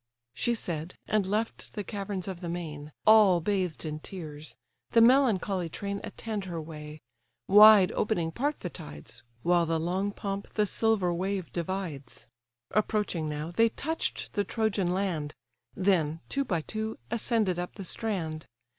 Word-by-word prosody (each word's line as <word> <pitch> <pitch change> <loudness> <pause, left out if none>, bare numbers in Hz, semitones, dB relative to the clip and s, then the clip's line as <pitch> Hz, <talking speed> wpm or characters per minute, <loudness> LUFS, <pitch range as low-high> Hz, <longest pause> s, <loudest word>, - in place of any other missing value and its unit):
She 235 - 0
said, 170 -5 -4
and 210 -3 +1
left 215 +3 -2
the 205 - -3
caverns 200 -3 -4
of 190 -2 -5
the 175 - -4
main, 155 -4 -5
All 215 -5 +7
bathed 185 -3 -1
in 155 0 -4
tears; 155 -4 -8 0.4
the 230 - +6
melancholy 225 -8 +4
train 200 +4 -4
Attend 215 -3 -5
her 170 -3 -4
way. 150 -1 -8 0.5
Wide 210 -1 +9
opening 175 -7 0
part 290 - -2
the 180 - -3
tides, 75 +11 -10 0.2
While 175 -1 +3
the 165 0 +1
long 185 +5 -1
pomp 200 0 -5
the 210 - +2
silver 205 -4 +1
wave 190 +1 -2
divides. 170 -7 -4 0.4
Approaching 210 -7 0
now, 150 +2 -4
they 225 +6 +4
touch'd 320 +8 -3
the 205 - +1
Trojan 200 -3 0
land; 180 -6 -2 0.4
Then, 170 -5 +1
two 275 0 0
by 175 -9 0
two, 220 +6 -4
ascended 220 -5 +1
up 180 - -5
the 195 - -6
strand. 165 -7 -3
185 Hz, 150 wpm, -29 LUFS, 165-210 Hz, 0.5 s, Wide